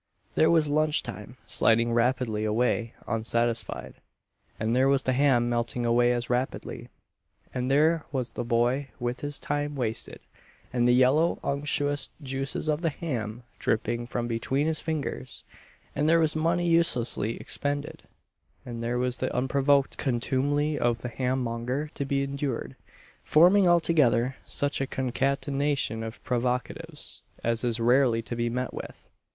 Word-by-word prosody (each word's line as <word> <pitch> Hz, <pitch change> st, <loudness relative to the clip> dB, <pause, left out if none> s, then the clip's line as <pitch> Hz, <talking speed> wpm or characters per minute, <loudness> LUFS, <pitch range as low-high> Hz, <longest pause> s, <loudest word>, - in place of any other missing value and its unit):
There 160 Hz, -, +4 dB
was 165 Hz, -2 st, +4 dB
lunch 155 Hz, +1 st, +2 dB
time -, -, -8 dB
sliding 115 Hz, +1 st, +3 dB
rapidly 120 Hz, -2 st, +1 dB
away 115 Hz, +1 st, 0 dB
unsatisfied; 115 Hz, -, -1 dB, 0.7 s
and 110 Hz, +2 st, 0 dB
there 130 Hz, +1 st, +4 dB
was 140 Hz, 0 st, +2 dB
the 130 Hz, -, +1 dB
ham 125 Hz, -3 st, +3 dB
melting 120 Hz, 0 st, -1 dB
away 120 Hz, +1 st, +3 dB
as 120 Hz, -1 st, -1 dB
rapidly; 125 Hz, +2 st, -3 dB, 0.6 s
and 125 Hz, 0 st, -2 dB
there 155 Hz, +3 st, +3 dB
was 125 Hz, -4 st, -2 dB
the -, -, -3 dB
boy 120 Hz, +4 st, +1 dB
with 120 Hz, 0 st, -2 dB
his 145 Hz, -1 st, -3 dB
time 145 Hz, 0 st, -2 dB
wasted, 115 Hz, -4 st, -3 dB, 0.5 s
and 120 Hz, -1 st, +2 dB
the 125 Hz, -, +5 dB
yellow 135 Hz, +7 st, +3 dB
unctuous 145 Hz, 0 st, -1 dB
juices 135 Hz, +1 st, -3 dB
of 155 Hz, +1 st, 0 dB
the 165 Hz, -, +1 dB
ham 120 Hz, -8 st, -4 dB, 0.2 s
dripping 120 Hz, +2 st, -1 dB
from 120 Hz, -1 st, -3 dB
between 125 Hz, +5 st, -1 dB
his 160 Hz, 0 st, +1 dB
fingers; 150 Hz, -, -4 dB, 0.5 s
and 150 Hz, +2 st, +1 dB
there 165 Hz, -, +5 dB
was 160 Hz, -2 st, +2 dB
money 170 Hz, +2 st, +1 dB
uselessly 125 Hz, -9 st, +3 dB
expended; 145 Hz, 0 st, -3 dB, 0.6 s
and 115 Hz, -2 st, -6 dB
there 120 Hz, +1 st, -1 dB
was 125 Hz, 0 st, -1 dB
the 130 Hz, -, -2 dB
unprovoked 140 Hz, +2 st, +2 dB
contumely 145 Hz, +4 st, 0 dB
of 120 Hz, -1 st, 0 dB
the 125 Hz, -, -3 dB
ham 130 Hz, +1 st, -1 dB
monger 125 Hz, +6 st, -3 dB
to 140 Hz, -, -3 dB
be 140 Hz, 0 st, 0 dB
endured 140 Hz, -2 st, -3 dB, 0.5 s
forming 180 Hz, +5 st, +5 dB
altogether 145 Hz, -8 st, +3 dB
such 145 Hz, -1 st, -1 dB
a 135 Hz, -, -1 dB
concatenation 135 Hz, -1 st, -1 dB
of 115 Hz, 0 st, -7 dB
provocatives 125 Hz, 0 st, -2 dB, 0.2 s
as 115 Hz, 0 st, 0 dB
is 120 Hz, -1 st, 0 dB
rarely 120 Hz, -1 st, +3 dB
to 120 Hz, -, -5 dB
be 120 Hz, 0 st, -1 dB
met 125 Hz, +2 st, -3 dB
with. -, -, -9 dB
130 Hz, 145 wpm, -27 LUFS, 120-145 Hz, 0.7 s, the